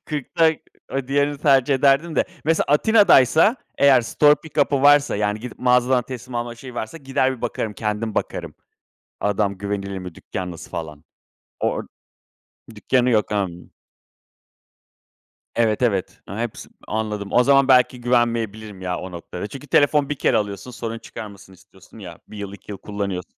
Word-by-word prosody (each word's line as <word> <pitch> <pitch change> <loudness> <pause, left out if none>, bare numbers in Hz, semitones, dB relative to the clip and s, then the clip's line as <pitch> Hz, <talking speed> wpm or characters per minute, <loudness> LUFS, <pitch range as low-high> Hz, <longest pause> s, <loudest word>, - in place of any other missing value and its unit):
40 150 +1 -6
da 165 -1 +6 0.4
o 135 -1 -2
diğerini 145 +1 +1
tercih 135 -1 +3
ederdim 140 +4 +2
de - - +3 0.2
mesela 160 +1 +2
Atina'daysa 190 - +5 0.2
eğer 140 -2 +6
store 145 +5 +4
pick 160 -1 -9
up'ı 140 -1 -1
varsa, 145 -3 +5
yani, 105 +1 -1
gidip 125 -1 -8
mağazadan 125 0 +3
teslim 125 0 -9
alma 120 0 -3
şeyi 125 +1 -11
varsa, 110 +7 -5
gider 130 -1 0
bir - - -18
bakarım. 115 -2 -2
Kendim 105 +1 -3
bakarım. - - -3 0.7
Adam 100 -1 0
güvenilir 100 -1 -4
mi, 90 -2 -8
dükkân 90 +1 -6
nasıl 85 - -10
falan? 75 -1 -7 0.6
Or - - -1 0.9
dükkânı 125 +4 +1
yok. 105 -2 +1
Imm. 95 -4 -3 1.8
Evet, 115 0 +1
evet, 100 -7 0
ha 100 - -7
hepsi 120 -2 -5 0.2
anladım. 105 -2 -3
O 125 - +5
zaman 135 0 +4
belki 125 -1 +4
güvenmeyebilirim, 115 -4 -1
ya, 90 -1 -2
o 95 - -7
noktada. 90 +3 -7
Çünkü 140 +5 -10
telefon 145 +1 +3
1 145 - -1
kere 125 - +1
alıyorsun, 105 +3 -3
sorun 115 -1 -5
çıkarmasın 100 -4 -10
istiyorsun, 95 +3 -18
ya, 85 -5 -10
1 105 - -10
yıl, 100 -1 -6
2 100 - -12
yıl 95 - -7
kullanıyors 100 -3 -4
115 Hz, 160 wpm, -22 LUFS, 100-135 Hz, 1.8 s, da